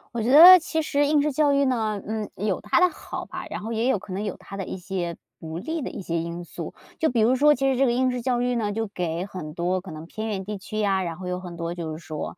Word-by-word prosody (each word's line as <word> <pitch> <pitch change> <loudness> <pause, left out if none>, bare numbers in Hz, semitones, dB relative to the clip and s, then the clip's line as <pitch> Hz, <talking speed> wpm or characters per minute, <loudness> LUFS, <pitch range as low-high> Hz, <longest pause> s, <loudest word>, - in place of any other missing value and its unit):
我 235 - -1
觉 240 - +1
得 345 +6 +11
其 320 -1 -2
实 290 -1 +1
应 295 0 +3
试 300 0 0
教 290 +1 +3
育 280 0 +3
呢， 220 -5 0
嗯， 215 -1 -3
有 200 -1 -1
它 210 - +2
的 365 - +6
好 315 - -7
吧， - - -7
然 - - -4
后 225 +2 -5
也 230 +3 +1
有 215 - +2
可 185 - -9
能 195 +3 -3
有 205 -4 -4
它 200 - -10
的 195 - -3
一 185 - -6
些 175 -2 -4 0.2
不 160 0 -6
利 320 - -3
的 - - -4
一 - - -7
些 170 -2 -2
因 170 +1 -5
素。 - - -7 0.3
就 320 - +2
比 245 - 0
如 230 +4 +4
说 295 +3 +5
其 270 0 +1
实 265 - +1
这 270 - +4
个 245 - +2
应 255 +2 +2
试 250 -1 -2
教 245 0 0
育 245 0 0
呢， 215 -3 -1
就 225 +2 -2
给 175 -3 -3
很 170 -6 -7
多 180 +2 -1
可 185 -2 -10
能 155 +1 -8
偏 220 +5 -5
远 190 -3 -3
地 210 +1 -4
区 215 +2 -6
呀， 195 -3 +1
然 170 -2 -4
后 180 0 -7
有 180 0 -3
很 175 -2 -8
多 170 +1 -3
就 165 -2 -5
是 155 - -5
说， 155 +2 -6
210 Hz, 320 characters per minute, -25 LUFS, 180-255 Hz, 0.3 s, 得